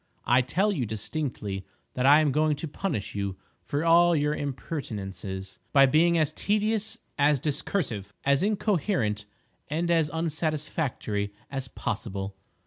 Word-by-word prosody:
I 125 Hz, +2 st, +5 dB
tell 185 Hz, +12 st, +1 dB
you 135 Hz, -, -1 dB
distinctly 105 Hz, -3 st, -3 dB, 0.3 s
that 130 Hz, +1 st, +1 dB
I 145 Hz, +2 st, +8 dB
am 150 Hz, -2 st, +2 dB
going 155 Hz, +2 st, +2 dB
to 160 Hz, -, -5 dB
punish 145 Hz, -, -3 dB
you 100 Hz, -2 st, -2 dB, 0.3 s
for 145 Hz, +3 st, -2 dB
all 170 Hz, +1 st, +6 dB
your 150 Hz, 0 st, +2 dB
impertinences 100 Hz, -, -5 dB
by 135 Hz, -2 st, +8 dB
being 165 Hz, +5 st, +4 dB
as 155 Hz, -3 st, +1 dB
tedious, 215 Hz, +1 st, 0 dB, 0.2 s
as 145 Hz, 0 st, +5 dB
discursive, 135 Hz, -, -2 dB
as 140 Hz, 0 st, +4 dB
incoherent 185 Hz, -, 0 dB, 0.4 s
and 170 Hz, +4 st, 0 dB
as 165 Hz, -3 st, +3 dB
unsatisfactory 155 Hz, -9 st, -2 dB, 0.2 s
as 135 Hz, -2 st, -3 dB
possible. 100 Hz, -5 st, -4 dB
145 Hz, 135 wpm, -27 LUFS, 110-165 Hz, 0.4 s, I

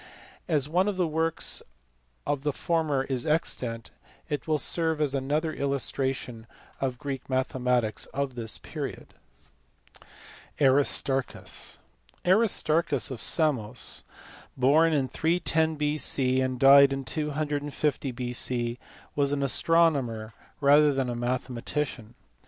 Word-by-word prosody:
As 150 Hz, -5 st, +1 dB
one 180 Hz, +5 st, +1 dB
of 205 Hz, -2 st, -2 dB
the 180 Hz, -, +2 dB
works 160 Hz, +1 st, -1 dB, 0.6 s
of 145 Hz, -2 st, -1 dB
the 150 Hz, +1 st, 0 dB
former 155 Hz, -3 st, 0 dB
is 130 Hz, -1 st, -3 dB
extant 120 Hz, -, -1 dB, 0.4 s
it 145 Hz, -4 st, -3 dB
will 155 Hz, -1 st, +2 dB
serve 160 Hz, +1 st, +2 dB
as 145 Hz, -3 st, +1 dB
another 150 Hz, +4 st, -1 dB
illustration 135 Hz, -4 st, -2 dB, 0.3 s
of 130 Hz, -2 st, -2 dB
Greek 135 Hz, 0 st, -5 dB
mathe 130 Hz, 0 st, -1 dB
matics 120 Hz, -4 st, 0 dB
of 140 Hz, -1 st, -3 dB
this 115 Hz, -3 st, -1 dB
period. -, -, -7 dB, 1.5 s
Aristarchus. 135 Hz, -1 st, 0 dB, 0.5 s
Aristarchus 170 Hz, -, +2 dB
of 120 Hz, -, -6 dB
Samos, 125 Hz, -8 st, 0 dB, 0.5 s
born, 150 Hz, +6 st, +4 dB
in 140 Hz, -4 st, +1 dB
310 160 Hz, 0 st, 0 dB
B.C. 140 Hz, -3 st, +1 dB
and 130 Hz, -1 st, -2 dB
died 140 Hz, +1 st, +8 dB
in 135 Hz, -1 st, -3 dB
250 145 Hz, 0 st, -2 dB
B.C., 120 Hz, -1 st, -2 dB, 0.4 s
was 140 Hz, -1 st, +1 dB
an 140 Hz, -1 st, -1 dB
astronomer 135 Hz, -8 st, +2 dB, 0.3 s
rather 145 Hz, +1 st, +5 dB
than 135 Hz, -3 st, -1 dB
a -, -, -4 dB
mathema 120 Hz, 0 st, -3 dB
tician. 130 Hz, -6 st, -4 dB
140 Hz, 115 wpm, -27 LUFS, 125-155 Hz, 1.5 s, died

